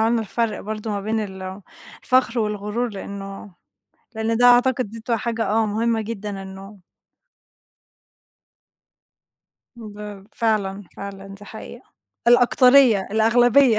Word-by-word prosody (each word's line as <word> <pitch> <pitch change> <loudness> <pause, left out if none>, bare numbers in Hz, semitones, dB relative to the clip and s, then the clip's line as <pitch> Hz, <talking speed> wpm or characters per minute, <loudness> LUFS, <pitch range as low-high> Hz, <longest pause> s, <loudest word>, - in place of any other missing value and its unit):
عملنا 230 +1 +2
الفرْق 225 +1 -2
برضه 215 +1 -5
ما 205 - -2
بين 220 +2 -1 0.8
الفخْر 255 -2 +2
والغُرور 210 +2 -2
لإنه 195 -1 -8 0.6
لإن 225 +1 -1
ده 245 - +4
أعتقد 245 -2 +4
دي 225 +1 -9
بتبقى 230 0 -1
حاجة، 230 -1 -2
آه 220 +1 +2
مهمّة 225 +2 0
جدًا 205 -2 -5
إنه 195 +1 -11 3.0
باب 210 -3 -9
فعلًا، 205 -3 -1
فعلًا 195 0 -8
دي 195 +1 -11
حقيقة، 225 +3 -10 0.4
الأكترية، 245 -3 +5
الأغلبية. 235 +2 +4
220 Hz, 110 wpm, -22 LUFS, 205-235 Hz, 3.0 s, الأكترية